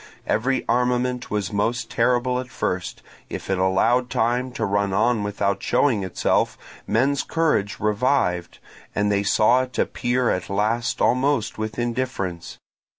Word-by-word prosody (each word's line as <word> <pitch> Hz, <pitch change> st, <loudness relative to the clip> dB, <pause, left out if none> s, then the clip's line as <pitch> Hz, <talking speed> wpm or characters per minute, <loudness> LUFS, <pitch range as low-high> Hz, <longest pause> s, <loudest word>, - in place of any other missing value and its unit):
Every 130 Hz, +4 st, 0 dB
armament 125 Hz, +1 st, 0 dB
was 105 Hz, -2 st, -2 dB
most 115 Hz, +4 st, -1 dB
terrible 125 Hz, +1 st, +1 dB
at 130 Hz, 0 st, -6 dB
first; 90 Hz, -7 st, -3 dB, 0.3 s
if -, -, -5 dB
it 95 Hz, -, 0 dB
allowed 115 Hz, +7 st, +2 dB
time 125 Hz, +3 st, 0 dB
to 110 Hz, -, -2 dB
run 100 Hz, -1 st, 0 dB
on 115 Hz, +2 st, +2 dB
without 100 Hz, -1 st, -1 dB
showing 120 Hz, -9 st, +2 dB
itself, 95 Hz, -2 st, 0 dB, 0.3 s
men's 135 Hz, +4 st, +2 dB
courage 150 Hz, -12 st, 0 dB
revived, 105 Hz, -5 st, 0 dB, 0.4 s
and 105 Hz, 0 st, +1 dB
they 100 Hz, 0 st, +2 dB
saw 110 Hz, +5 st, +4 dB
it 130 Hz, 0 st, -6 dB
appear 125 Hz, 0 st, 0 dB
at 90 Hz, -, -3 dB
last 110 Hz, +4 st, 0 dB
almost 130 Hz, -3 st, +1 dB
with 110 Hz, -1 st, -4 dB
indifference. 120 Hz, -8 st, -3 dB
115 Hz, 140 wpm, -23 LUFS, 100-125 Hz, 0.4 s, saw